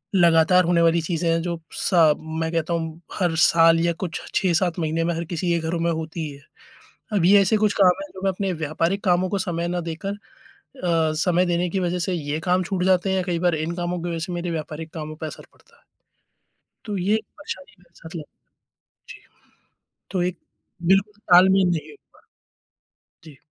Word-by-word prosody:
लगातार 170 +1 +5
होने 170 -1 +3
वाली 165 0 +3
चीज़ें 165 0 -1
हैं 165 0 +1
जो 170 -2 -3 0.2
सा 165 -5 +4 0.3
मैं 160 0 -1
कहता 165 0 -1
हूँ 165 0 -4
हर 175 -3 0
साल 165 0 +5
या 170 0 +1
कुछ 160 -4 -4
6-7 175 -2 +1
महीने 160 +1 0
में 170 - 0
हर 170 - -3
किसी 175 0 -2
के 170 - +1
घरों 170 0 -1
में 170 0 +1
होती 160 -1 -4
है। 140 0 -13 0.7
अब 190 -5 +2
ये 200 +2 +7
ऐसे 205 +3 +2
कुछ 210 -1 +2
काम 180 -1 +7
हैं 195 - -10
जो 190 - -10
मैं 195 - +2
अपने 190 0 -2
व्यापारिक 165 +5 -1
कामों 180 -1 +2
को 200 - -1
समय 170 -2 -2
न 175 0 -2
देकर 170 +5 -4 0.7
अ, 165 -3 +2
समय 180 0 +2
देने 175 0 0
की 190 - -1
वज़ह 180 0 -1
से 180 +2 -1
ये 150 -2 -3
काम 180 +1 +1
छूट 180 0 -2
जाते 190 0 +2
हैं 190 - +1
या 185 - 0
कई 175 -2 -2
बार 175 -2 +2
इन 160 +2 -3
कामों 175 0 -3
की 175 - -3
वज़ह 165 - -3
से 180 - -6
मेरे 175 0 -3
व्यापारिक 160 0 -6
कामों 155 -1 -6
पे 160 - -6
असर - - -10
पड़ता - - -26
है। - - -34 1.0
तो 205 -2 -3
ये 195 +4 +1 0.2
परेशानी 195 -10 -8
मेरे 170 -1 -27
साथ 165 +1 -11
लग 155 - -6 0.8
जी। - - -11 0.9
तो 185 -2 0
एक 180 0 -3 0.5
बिल्कुल 205 +2 +2
तालमेल 190 +1 +6
नहीं 165 -3 -2
हो - - -14 0.2
पा - - -22 0.9
रहा। - - -84
जी। 150 -4 -14
175 Hz, 205 wpm, -23 LUFS, 165-185 Hz, 1.0 s, ये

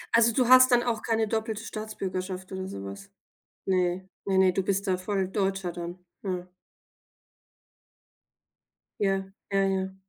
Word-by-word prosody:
Also, 230 0 +6
du 245 +1 +2
hast 255 0 +8
dann 240 0 +5
auch 230 -3 -1
keine 225 -1 +1
doppelte 220 0 -2
Staatsbürgerschaft 190 -4 -5
oder 190 0 -4
sowas? 100 - -7 0.6
Ne, 185 0 0 0.2
ne, 190 -1 +1
ne, 190 -1 +6
du 195 - +1
bist 195 +2 0
da 185 -1 +1
voll 190 0 -1
Deutscher 195 -2 -1
dann, 175 +1 -6 0.2
mhm. 180 -2 -3 2.5
Ja, 195 -1 0 0.2
ja, 195 0 +3
ja. 190 0 -1
195 Hz, 135 wpm, -28 LUFS, 185-215 Hz, 2.5 s, hast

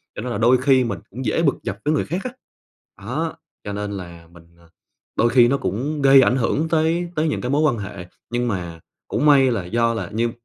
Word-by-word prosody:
cho - - -5
nên 125 0 -4
là 100 - -2
đôi 120 +3 +4
khi 130 0 +3
mình 105 -5 -3
cũng 125 +4 -7
dễ - - +1
bực 140 - +3
dọc 95 - -4
với 150 - +2
người - - 0
khác 175 +5 -3
á. 255 - -4 0.7
Đó, 160 0 -3 0.3
cho 100 - -5
nên 105 0 -4
là 85 -3 -9
mình, 85 -1 -16
à 85 - -21 0.5
đôi 120 - +3
khi 120 -1 +5
nó 140 - +2
cũng 140 +4 -3
gây 135 0 +7
ảnh 125 - +3
hưởng 145 +6 0
tới 165 +2 +1
tới 155 +1 +1
những - - -2
cái 125 - -3
mối 145 +2 +2
quan 120 -7 +2
hệ. 100 -3 -7 0.2
Nhưng 120 0 -1
mà 85 -5 -4 0.3
cũng 150 - 0
may 135 -3 +6
là 100 -7 -2
do 115 +3 +1
là 115 - -5
như 115 +2 0
125 Hz, 240 wpm, -21 LUFS, 105-145 Hz, 0.7 s, gây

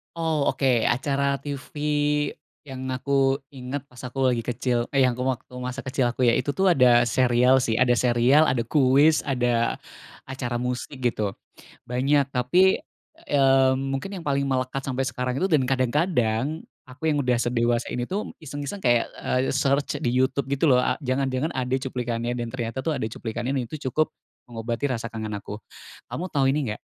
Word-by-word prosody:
Oh, 160 -3 0
oke. 130 -4 +2
Acara 140 +2 +1
TV 145 +1 -1 0.3
yang 130 -2 -8
aku 135 +1 +1
ingat, 135 +1 -5
pas 125 - -15
aku 130 +1 0
lagi 120 -2 -1
kecil 120 0 -1
eh, 135 -1 +4
yang 125 - -1
waktu 125 0 -3
masa 125 +1 -5
kecil 130 -2 0
aku 125 0 +1
ya, 115 - +4
itu 145 - 0
tuh 190 +6 +1
ada 125 -5 +5
serial 125 +2 +4
sih, 115 -1 0
ada 125 -1 +4
serial, 125 +5 +4
ada 125 -2 +1
kuis, 145 +3 +4
ada 120 -4 0 0.5
acara 130 -2 -4
musik 125 +2 -4
gitu. 110 -5 0 0.6
Banyak, 135 +3 +1
tapi, 160 +10 +3 0.5
eee, 135 -2 +4
mungkin 135 +8 -3
yang 180 -4 -7
paling 140 -1 +1
melekat 130 0 -1
sampai 135 0 -1
sekarang 125 -1 -2
itu 190 - +1
dan 140 -5 +3
kadang-kadang, 130 +1 0 0.2
aku 130 +3 -15
yang 150 - +1
udah 125 -2 +1
sedewasa 120 0 0
ini 125 0 -3
tuh 205 +3 -3
iseng-iseng 145 +4 -6
kayak, 120 -9 +2 0.2
eee, 130 +1 +1
search 140 +1 0
di 120 0 -1
YouTube 130 +1 +1
gitu 140 +2 +1
loh. 125 - +5
A 125 - +2
jangan-jangan 130 +3 -1
ada 130 0 -2
cuplikannya 120 -3 -3
dan 120 - -2
ternyata 120 0 -4
tuh 150 +4 -1
ada 130 - -3
cuplikannya. 120 +2 -4
Dan 120 - -2
itu 140 0 -5
cukup 155 +5 0 0.3
mengobati 115 +3 -3
rasa 115 -2 -3
kangen 110 -1 -5
aku. 100 +1 -6 0.5
Kamu 180 +2 -5
tahu 140 -3 +2
ini, 135 -5 0
nggak - - -8
130 Hz, 170 wpm, -24 LUFS, 120-140 Hz, 0.6 s, ada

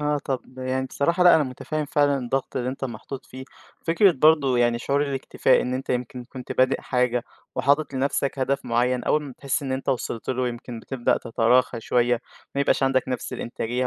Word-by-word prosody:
آه، 150 0 +1
طب 130 -1 -4
يعني 130 +1 -1
بصراحة 170 +7 +1
لأ 175 - +9
أنا 155 - +3
متفهم 150 +4 -4
فعلًا 145 -1 +2
الضغط 130 +2 -2
اللي 125 0 -1
أنت 135 +1 -4
محطوط 130 +2 -7
فيه، 130 +1 -9 0.4
فكرة 175 +3 +5
برضه 140 -3 +4
يعني 120 -1 +2
شعور 140 +4 0
الاكتفاء 140 -2 +1
إن 125 0 -2
أنت 130 - -4
يمكن 125 0 -3
كنت 130 0 -7
بادئ 130 +1 +2
حاجة 125 -1 0 0.3
وحاطط 140 +1 +1
لنفسك 140 +1 0
هدف 135 +1 0
معين، 125 +1 +1
أول 150 - +2
ما 140 -3 -8
بتحس 135 +2 -2
إن 135 - -3
أنت 130 +1 -4
وصلت 120 -3 -2
له 125 -1 0
يمكن 120 -1 -7
بتبدأ 130 -1 0
تتراخى 115 +1 +2
شوية، 120 0 +1 0.3
ما 140 - 0
يبقاش 140 - +2
عندك 135 -1 +2
نفس 125 -2 -3
الإنتاجية 120 +2 -2
130 Hz, 190 wpm, -24 LUFS, 125-140 Hz, 0.4 s, لأ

